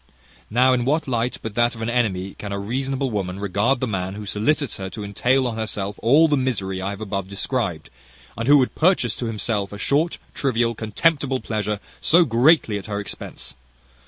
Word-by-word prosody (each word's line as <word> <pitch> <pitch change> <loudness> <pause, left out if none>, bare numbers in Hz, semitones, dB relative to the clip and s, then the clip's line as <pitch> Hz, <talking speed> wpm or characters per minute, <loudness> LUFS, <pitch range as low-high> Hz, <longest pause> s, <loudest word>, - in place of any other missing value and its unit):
Now 125 +4 +4
in 125 -1 +1
what 150 +5 0
light, 120 -1 -1
but 110 - -4
that 120 +1 +2
of 115 - -9
an - - -2
enemy, 100 -6 0
can 100 - -6
a 100 - -2
reasonable 130 +5 -2
woman 95 -3 -3
regard 105 +6 +1
the 130 - 0
man 95 -2 -3
who 105 0 -7
solicits 125 +6 0
her 95 -1 -5
to 105 +1 -7
entail 125 +6 +1
on 115 -2 -2
herself 105 -2 -3
all 145 +8 +5
the 150 - +2
misery 100 -8 -1
I 95 - -2
have 100 -2 -4
described 100 - -2
to - - -18
you, 65 -1 -25
and 115 +1 -3
who 145 +1 +8
would 130 -2 +2
purchase 160 - +2
to 120 - -3
himself 105 -2 -2
a 105 - -7
short, 150 +10 +1 0.2
trivial, 120 -4 +1
contemptible 130 +5 0
pleasure, 105 -3 -2 0.2
so 170 +2 +5
greatly 120 -3 +3
at 100 - -10
her 100 -1 -3
expense! 105 - -7
115 Hz, 200 wpm, -22 LUFS, 100-130 Hz, 0.2 s, who